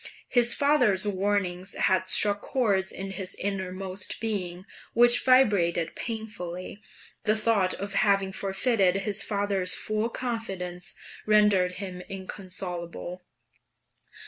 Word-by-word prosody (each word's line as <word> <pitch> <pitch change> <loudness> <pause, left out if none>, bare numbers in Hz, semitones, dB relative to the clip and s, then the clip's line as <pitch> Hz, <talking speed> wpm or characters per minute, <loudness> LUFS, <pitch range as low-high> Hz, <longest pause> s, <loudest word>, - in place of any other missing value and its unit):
His 240 -1 +3
father's 250 -10 +3
warnings 190 -2 -1
had 185 0 +1
struck 205 +1 +5
chords 200 -7 0
in 195 +1 -6
his 190 -2 -3
innermost 190 -1 -4
being, 185 -5 -3 0.3
which 240 +1 +5
vibrated 200 -11 +3
painfully; 210 -4 -6 0.4
the 215 +1 +4
thought 215 -4 +2
of 200 +1 -5
having 195 -2 +2
forfeited 195 0 +1
his 205 0 -2
father's 200 -3 0
full 215 +2 -1
confidence 195 -8 -4 0.3
rendered 210 -4 +4
him 185 -1 -6
inconsolable. 185 -2 -6
195 Hz, 105 wpm, -27 LUFS, 185-215 Hz, 0.4 s, struck